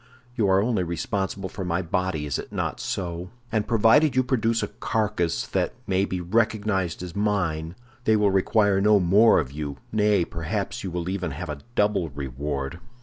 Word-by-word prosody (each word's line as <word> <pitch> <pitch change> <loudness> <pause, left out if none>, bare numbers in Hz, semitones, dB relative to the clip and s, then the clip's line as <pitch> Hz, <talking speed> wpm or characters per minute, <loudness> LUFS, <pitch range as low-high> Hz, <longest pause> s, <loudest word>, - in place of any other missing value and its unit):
You 110 -5 +2
are 95 +1 +4
only 115 -4 +1
responsible 95 +3 -2
for 95 - -6
my 90 +1 -1
body, 85 -3 -1
is 70 -3 -2
it - - -8
not - - -2
so? 90 -1 -4 0.2
And 110 -2 0
provided 120 +6 +4
you 130 - +4
produce 115 -2 +1
a - - -2
carcass 105 -7 -1
that - - -1
may 95 0 +1
be 95 -2 -3
recognized 100 -2 0
as 90 -2 -7
mine, 90 -6 -1 0.3
they 110 - +4
will 105 -2 +3
require 100 +1 +3
no 105 0 +5
more 100 +6 +5
of 70 -5 -3
you; 70 -1 -5
nay, 105 -4 +3
perhaps 90 +6 -3
you 95 - -3
will 85 0 -4
even 95 -1 -2
have 90 -3 -6
a 75 -1 -4 0.2
double 105 -5 +2
reward." 70 +2 -4
95 Hz, 180 wpm, -25 LUFS, 85-105 Hz, 0.3 s, no